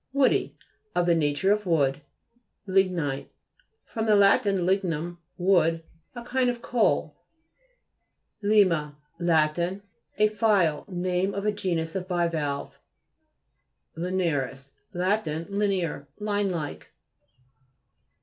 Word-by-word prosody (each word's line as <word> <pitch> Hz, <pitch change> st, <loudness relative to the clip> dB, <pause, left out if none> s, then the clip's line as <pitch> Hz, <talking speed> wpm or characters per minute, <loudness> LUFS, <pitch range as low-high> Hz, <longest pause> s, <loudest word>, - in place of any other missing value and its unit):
Woody; 275 Hz, -2 st, +2 dB, 0.4 s
of 175 Hz, -, +2 dB
the 175 Hz, -, +4 dB
nature 155 Hz, +4 st, +1 dB
of 210 Hz, -1 st, 0 dB
wood. 145 Hz, -4 st, +2 dB, 0.6 s
LI'GNITE 180 Hz, -8 st, 0 dB, 0.6 s
fr. 225 Hz, -, -5 dB
lat. 205 Hz, -2 st, +5 dB
lignum, 175 Hz, -3 st, 0 dB, 0.2 s
wood. 170 Hz, -3 st, +2 dB, 0.3 s
A 240 Hz, -, -7 dB
kind 255 Hz, +1 st, +1 dB
of 245 Hz, -1 st, -3 dB
coal. 240 Hz, -3 st, +1 dB, 1.3 s
LI/MA 185 Hz, -8 st, +3 dB, 0.3 s
Lat. 160 Hz, -2 st, +2 dB
A 200 Hz, +4 st, -2 dB
file. 200 Hz, -8 st, +2 dB
Name 185 Hz, +1 st, -1 dB
of 200 Hz, +1 st, -3 dB
a 210 Hz, -, +3 dB
genus 170 Hz, -5 st, -2 dB
of 185 Hz, -1 st, -3 dB
bivalves. 165 Hz, -6 st, -2 dB, 1.2 s
LINEA'RIS 155 Hz, -7 st, -2 dB, 0.2 s
Lat. 185 Hz, +2 st, 0 dB
Linear, 170 Hz, -2 st, -2 dB
line 205 Hz, -1 st, -1 dB
like. 150 Hz, -, -5 dB
180 Hz, 100 wpm, -26 LUFS, 160-200 Hz, 1.3 s, lat